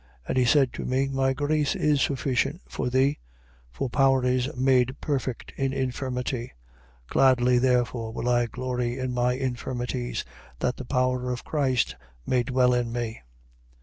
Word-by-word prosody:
And - - -1
he 130 -1 +3
said 135 0 +4
to - - -5
me: 135 +2 0
My 135 0 +1
grace 145 +1 0
is 150 -2 +2
sufficient 135 +4 0
for - - -3
thee: 135 +3 +2 0.5
for 130 - -3
power 135 0 +3
is 125 +1 +1
made 130 0 +2
perfect 135 -5 -3
in 135 -1 0
infirmity. 125 - -3 0.5
Gladly 125 -2 +4
therefore 120 -2 +1
will 120 +1 -4
I 120 -1 +3
glory 125 0 -3
in 130 -1 -2
my 125 0 +2
infirmities, 125 -1 -3 0.3
that 125 - -1
the 130 - -7
power 125 -1 0
of 125 - -5
Christ 135 -5 0 0.3
may 125 -1 +2
dwell 125 +1 +2
in 120 -1 0
me. 115 - -4
125 Hz, 150 wpm, -26 LUFS, 125-135 Hz, 0.5 s, said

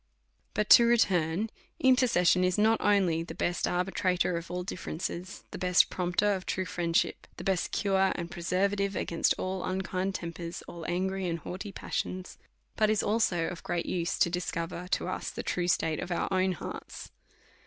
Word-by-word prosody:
But 210 0 +1
to 235 - +10
return: 195 -3 +2 0.3
Intercession 240 -9 +4
is 180 0 +2
not 220 +2 +3
only 190 -6 +3
the 165 - -7
best 175 - 0
ar 180 +1 +1
bitrator 180 -2 0
of 170 0 -5
all 180 +1 -3
differences, 180 +1 -5
the - - -6
best 180 -1 +4
promoter 180 +3 +1
of 190 -1 -5
true 185 - -1
friendship, 170 -2 0
the - - -7
best 190 -2 0
cure 195 -2 +2
and 170 0 -5
preservative 195 +3 0
against 170 - +1
all 185 0 -3
unkind 185 0 -2
tempers, 170 0 -5
all 170 -1 -8
angry 190 +1 -1
and 170 -1 -1
haughty 185 +5 -6
passions, 185 -1 -4 0.4
but 215 -1 +3
is 215 -1 +2
also 205 -6 +1
of 180 +1 -5
great 170 -1 -2
use 175 +1 -1
to 170 - +3
discover 175 0 -3
to - - -1
us - - -3
the - - -6
true 175 -1 -1
state 160 -2 +1
of 180 - -5
our 175 - -1
own 185 0 +2
hearts. 170 - -8
185 Hz, 175 wpm, -29 LUFS, 175-195 Hz, 0.4 s, to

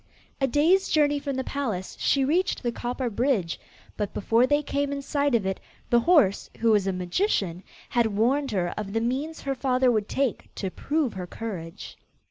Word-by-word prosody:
A 270 - +3
day's 325 +9 +3
journey 290 -2 +3
from 280 -1 -3
the 260 - -1
palace, 225 -11 -3
she 275 -1 +2
reached 340 +4 +1
the 240 - 0
copper 245 +2 -3
bridge, 230 -7 0 0.4
but 205 -2 -3
before 230 +5 +3
they 290 +2 +2
came 285 0 -1
in 280 0 -4
sight 285 -2 +1
of 215 -4 +1
it, 190 0 -2 0.3
the 240 - +6
horse, 280 - +3
who 230 0 +3
was 205 -3 +3
a - - +2
magician, 180 - -1 0.3
had 235 -2 +2
warned 245 +7 +1
her 185 -6 0
of 200 -1 -5
the 225 - +1
means 275 +7 -2
her 275 - -1
father 255 -1 +2
would 215 -3 0
take 270 -4 -1
to 190 - -3
prove 295 - -1
her 180 -2 -6
courage. 180 -5 -7
245 Hz, 190 wpm, -26 LUFS, 205-285 Hz, 0.4 s, the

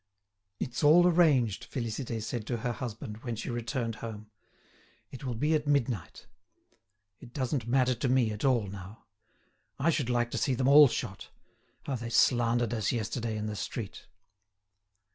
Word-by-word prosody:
"It's 125 - -3
all 165 +4 +7
arranged," 150 - +3
Félicité 115 -2 -3
said 110 0 -4
to 120 - -1
her 120 - +1
husband, 110 -4 -6
when 120 0 -5
she 115 +3 -5
returned 120 -1 -3
home. 110 -1 -8 0.8
"It 130 - -9
will 125 -3 -3
be 150 +7 +1
at 150 -1 0
midnight. 125 -10 -1 0.9
It 120 - -14
doesn't 130 -3 -2
matter 130 +1 +3
to 125 +2 -2
me 125 -4 +3
at 105 - -6
all 125 -6 +3
now. 100 +2 -10 0.7
I 160 +5 +2
should 140 -6 -1
like 120 -1 0
to - - -2
see 135 - +1
them 130 +1 0
all 145 +1 +9
shot. 100 -5 -5 0.6
How 140 - -3
they 115 0 -6
slandered 120 -1 +3
us 110 -4 0
yesterday 115 0 -2
in 105 - -3
the 105 -1 -4
street!" 105 0 -6
120 Hz, 160 wpm, -29 LUFS, 110-130 Hz, 0.9 s, all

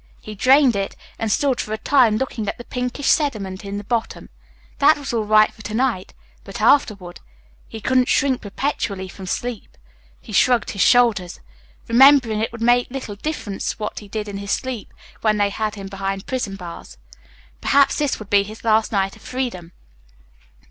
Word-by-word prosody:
He 215 - -9
drained 260 +3 +4
it, 195 0 -3 0.2
and 225 -2 -1
stood 270 +2 +1
for 215 - -5
a - - -2
time 235 -3 +3
looking 230 -4 -3
at - - -5
the 240 - -9
pinkish 250 +3 -4
sediment 215 -13 0
in 200 0 -5
the 205 - -6
bottom. 230 +2 -3 0.5
That 290 +2 +5
was 280 -3 -6
all 225 -2 0
right 215 0 +4
for 220 - -15
to 215 0 -5
night, 235 -6 -1 0.3
but - - -8
afterward 200 -10 +2 0.5
he 220 - -8
couldn't 255 +3 +2
shrink 265 -2 +2
perpetually 200 -3 -3
from 190 +1 -10
sleep. 240 +4 -5 0.4
He - - -12
shrugged 245 -3 +3
his 195 - -3
shoulders, 220 -8 +3 0.5
remembering 250 -2 +5
it 220 - -1
would 230 0 -6
make 245 +1 +3
little 250 -5 -6
difference 210 -5 -4
what 210 -1 -5
he 210 - -13
did 210 +1 -5
in 200 -1 -6
his 200 0 -7
sleep 250 0 -3 0.3
when 215 -1 +2
they 205 -1 +1
had 215 +1 -3
him 200 -1 -8
behind 195 0 -4
prison 245 -7 -3
bars. 175 - -10 0.6
Perhaps 280 -1 +3
this 290 -3 0
would 215 -2 -11
be 200 -1 +5
his 215 +2 -9
last 220 -1 +2
night 195 -2 0
of - - -18
freedom. 235 -10 -5
220 Hz, 185 wpm, -21 LUFS, 200-255 Hz, 0.6 s, That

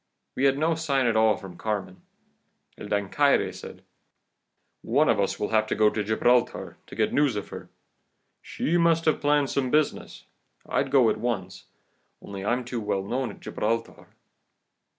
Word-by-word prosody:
We 135 - +1
had 135 0 +3
no 160 +3 +1
sign 145 -5 0
at 115 -2 +1
all 110 -1 +4
from 95 -4 -11
Carmen. 100 -4 -4 0.7
El - - -9
Dancaire 105 +8 +1
said: - - -11 1.0
'One - - +2
of - - +2
us - - -1
will 105 - -2
have 110 -1 +2
to - - -1
go 105 0 +4
to 105 - -2
Gibraltar 120 +3 +1
to - - -11
get 110 -1 0
news 145 -4 +2
of 105 - -5
her. - - -9 0.7
She 170 +3 -1
must 165 -1 +3
have 155 - +2
planned 145 -1 +2
some 130 -2 0
business. 150 +2 -1 0.4
I'd 135 - 0
go 130 -5 +4
at - - -3
once, 100 -5 -4 0.5
only 100 -1 -8
I'm 120 +4 -1
too 120 -1 -4
well 105 -2 -1
known 125 +5 -2
at 100 - -12
Gibraltar. 115 +2 -3
120 Hz, 170 wpm, -26 LUFS, 105-140 Hz, 1.0 s, all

